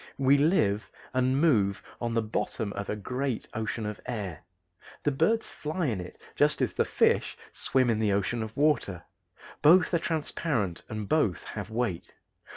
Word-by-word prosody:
We 135 +1 +5
live 140 - +2 0.2
and 130 +1 +2
move 105 - +3 0.2
on 120 -1 -1
the 115 - +2
bottom 110 -1 -2
of 100 0 -5
a - - -1
great 125 +4 -3
ocean 110 0 -3
of 105 0 -5
air. 100 -9 -4 0.6
The 145 - +2
birds 225 +11 +1
fly 160 +3 -3
in 110 -9 -1
it 90 - -10 0.2
just - - +3
as - - 0
the - - +1
fish - - +2
swim 130 -1 +1
in 110 - 0
the 110 -2 +2
ocean 105 +4 0
of 110 0 -6
water. 140 - +1 0.6
Both 180 +5 +6
are 170 - +4
transparent 145 - -2
and 110 -2 -4
both 110 - +1
have - - -6
weight. 110 -6 -3
115 Hz, 165 wpm, -28 LUFS, 105-145 Hz, 0.6 s, Both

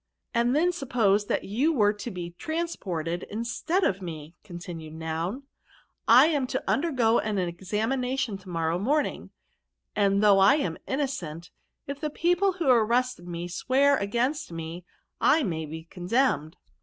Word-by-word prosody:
'' - - -57
* - - -51
And 240 +2 +2
then 345 +4 +3
suppose 225 - +1
that - - 0
you 250 +11 +1
were 210 -8 +3
to 210 +3 -6
be 175 -4 -6
transported 185 - -3
instead 240 - -1
of 195 - +1
me/ 160 -3 -7
continued 170 -4 -8
Noun^ 165 - -3 0.4
* - - -39
I 250 +5 +8
am 290 -5 +1
to - - -3
'Undergo 255 -7 +2
an 210 -1 -2
examination 220 +7 -1
to 185 -1 -14
morrow 165 0 -1
morning; 290 +9 0 0.7
and 200 0 +2
though 200 -2 +6
I 195 +8 +6
am 295 - -2
innocent, 185 - -3 0.3
if 280 0 -6
the 305 0 -2
pe<^le 355 +5 +1
who 335 -5 -2
arrested 245 -4 +2
me 175 0 -4
swear 270 +10 +2
against 240 - -1
me, 165 +1 -6 0.3
I 320 - +4
may 160 - -2
be 160 +2 -7
condemned 175 - 0
215 Hz, 155 wpm, -27 LUFS, 175-270 Hz, 0.7 s, I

